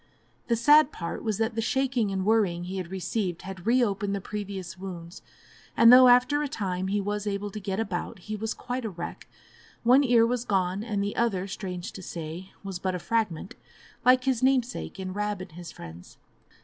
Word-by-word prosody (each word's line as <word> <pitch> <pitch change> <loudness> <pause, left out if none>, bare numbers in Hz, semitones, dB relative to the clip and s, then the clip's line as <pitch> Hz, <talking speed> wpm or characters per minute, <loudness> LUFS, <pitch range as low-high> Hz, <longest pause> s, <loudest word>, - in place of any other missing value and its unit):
The 235 - +2
sad 295 +7 +6
part 170 - -5
was 215 -3 -1
that 225 +1 0
the 225 - -1
shaking 250 -3 0
and 190 -1 -2
worrying 200 -6 +2
he 185 +2 -5
had 180 -2 -4
received 190 -1 -3
had 190 0 -8
reopened 205 -5 +2
the - - -2
previous 195 -3 -6
wounds, 180 -2 -8 0.6
and 230 +1 +8
though 255 0 +9
after 250 +4 +5
a 295 - -1
time 190 -8 -3
he 205 +2 0
was 205 +1 -3
able 205 0 -2
to 215 - -6
get 195 0 -3
about, 195 -5 -3
he 215 +4 -6
was 220 +1 -3
quite 250 0 -4
a 220 - -2
wreck; 175 -2 -7 0.6
one 255 +4 +6
ear 240 -3 +5
was 240 0 -1
gone, 190 -2 0
and 210 -3 -1
the 205 - -3
other, 200 -6 0
strange 185 -2 -5
to 190 - -9
say, 170 +1 -7
was 195 -3 -5
but 185 0 -1
a - - -1
fragment, 190 +1 -2 0.5
like 255 0 +5
his 260 -3 +1
namesake 255 -5 0
in 185 -1 -4
"Rab 210 0 -2
and 185 -2 -8
his 170 0 -9
Friends." 85 - -12
205 Hz, 200 wpm, -27 LUFS, 185-230 Hz, 0.6 s, though